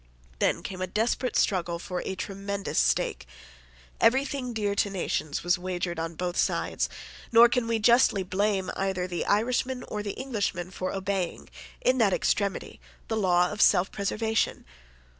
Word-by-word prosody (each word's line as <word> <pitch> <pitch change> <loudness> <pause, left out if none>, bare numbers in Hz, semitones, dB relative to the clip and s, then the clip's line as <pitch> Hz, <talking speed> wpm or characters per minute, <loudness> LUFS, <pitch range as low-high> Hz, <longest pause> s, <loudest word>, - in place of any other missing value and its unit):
Then - - +1
came 185 -1 -6
a 185 - -1
desperate 235 +6 -1
struggle 175 -3 +1
for 180 +1 -4
a 190 - -4
tremendous 195 - -3
stake. - - +1 0.7
Everything 265 +1 +2
dear 210 -3 -1
to 200 - +1
nations 175 -6 -2
was 175 +1 +2
wagered 180 -2 -3
on 165 0 -4
both 180 +1 -3
sides: - - 0 0.4
nor 235 +1 +8
can 240 -1 0
we 230 0 +1
justly 220 -3 +4
blame 190 0 0
either 190 -2 -1
the 175 -1 -3
Irishman 250 +4 +1
or 210 - -4
the 205 -1 -4
Englishman 200 -9 -2
for 185 -1 -3
obeying, 190 -2 -3 0.3
in 255 0 +2
that 205 -5 +4
extremity, 200 +1 -1 0.3
the 225 - 0
law 180 -4 +3
of 210 0 -3
self 180 +2 +4
preservation. 220 +2 -1
195 Hz, 155 wpm, -27 LUFS, 180-225 Hz, 0.7 s, nor